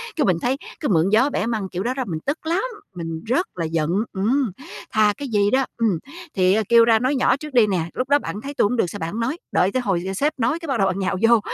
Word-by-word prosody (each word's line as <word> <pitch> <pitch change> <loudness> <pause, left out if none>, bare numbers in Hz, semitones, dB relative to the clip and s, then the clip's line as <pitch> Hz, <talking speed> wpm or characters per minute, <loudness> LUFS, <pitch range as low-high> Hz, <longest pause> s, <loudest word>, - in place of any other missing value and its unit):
Cái, 300 - +1
mình 180 -5 +2
thấy 260 +3 0 0.2
cứ 300 - -2
mượn 175 -1 +3
gió 245 +7 +4
bẻ 275 - -1
măng 220 -5 -2
kiểu 180 +2 -4
đó 245 +3 -1
đó 260 -1 -2
mình 160 -3 -3
tức 290 +3 -3
lắm, 345 +5 0 0.3
mình 165 0 -5
rất 260 +11 +1
là 170 -2 -2
giận, 160 -1 -1 0.2
ừm, 225 +4 +1 0.4
thà 215 -1 +3
cái 285 - -5
gì 205 -4 +2
đó, 265 0 +3
ừm, 215 -8 +1 0.4
thì, 185 0 +4
ờ, 220 - +2
kêu 235 -1 +7
ra 225 -1 +4
nói 260 +4 +1
nhỏ 260 +1 +3
trước 300 -1 -9
đi 230 -4 +5
nè, 185 -4 0
lúc 255 +2 -3
đó 285 - +5
bạn 210 - -6
thấy 280 +3 -6
tôi - - +2
hổng 245 +4 0
được - - +3
sao 205 - -7
bạn 165 -1 -3
hổng 220 - -4
nói, 260 +8 -1
đợi 190 +2 +2
tới 255 - 0
hồi 185 -6 -1
sếp 295 +7 +1
nói 310 +8 +1
cái 330 - -8
bắt 270 - 0
đầu 195 -1 +3
nhào 190 0 -1
vô 235 - +6
225 Hz, 280 wpm, -22 LUFS, 190-265 Hz, 0.4 s, kêu